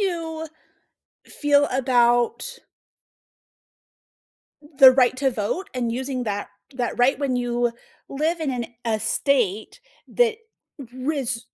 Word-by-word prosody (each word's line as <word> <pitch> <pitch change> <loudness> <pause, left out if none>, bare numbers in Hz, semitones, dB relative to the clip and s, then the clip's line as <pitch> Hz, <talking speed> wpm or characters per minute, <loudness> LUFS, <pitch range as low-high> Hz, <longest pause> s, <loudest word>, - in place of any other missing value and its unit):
you 325 -4 -3 0.8
feel 290 -1 +2
about 250 - +1 2.2
the 265 -1 +10
right 255 -1 +3
to 265 0 +1
vote 235 - -3
and 240 -2 -1
using 260 +1 -3
that 205 -2 -3 0.3
that 245 -2 -3
right 250 +3 +3
when 275 -3 -1
you 240 -1 0 0.4
live 320 +4 -1
in 300 - -1
an 245 -2 -3 0.2
a 220 -1 +1
state 220 - 0 0.3
that 465 -2 +2 0.6
risk 260 -3 -2
260 Hz, 110 wpm, -23 LUFS, 240-295 Hz, 2.2 s, the